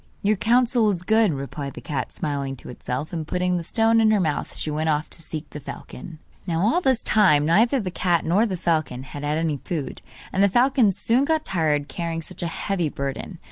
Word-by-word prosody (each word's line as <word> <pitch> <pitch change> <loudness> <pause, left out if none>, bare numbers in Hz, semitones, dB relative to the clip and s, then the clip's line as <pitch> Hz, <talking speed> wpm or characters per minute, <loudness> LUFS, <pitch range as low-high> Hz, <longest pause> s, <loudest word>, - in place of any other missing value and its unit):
'Your 210 +2 +3
counsel 235 +1 +3
is 180 -4 -2
good,' 220 0 +3
replied 140 0 -5
the - - -7
cat, 135 -4 -4
smiling 140 -3 -3
to 120 - -11
itself; 125 +5 -5
and 160 -3 -4
putting 180 +1 0
the - - -2
stone 225 +6 +3
in 220 - +4
her 215 -1 +3
mouth 155 -5 -2
she 155 - -2
went 155 +2 -1
off 150 0 -1
to - - -8
seek 155 -1 -6
the 150 - -7
falcon. 150 +3 -9 0.3
Now 165 -1 0
all 235 - +2
this 260 -7 +1
time 170 -9 +4
neither 225 - +4
the 190 -5 -3
cat 175 -2 +1
nor 200 +8 +3
the 190 -3 -3
falcon 155 -7 -1
had 145 +2 -8
had 150 +1 0
any 160 -3 0
food, 150 +1 -5 0.3
and 195 - +2
the 200 - +5
falcon 245 0 +4
soon 230 +7 +1
got 315 +1 0
tired 150 -5 +1
carrying 165 +2 -4
such 180 +2 -10
a 175 - -1
heavy 175 -1 -2
burden. 140 +7 -5
170 Hz, 220 wpm, -23 LUFS, 150-215 Hz, 0.3 s, the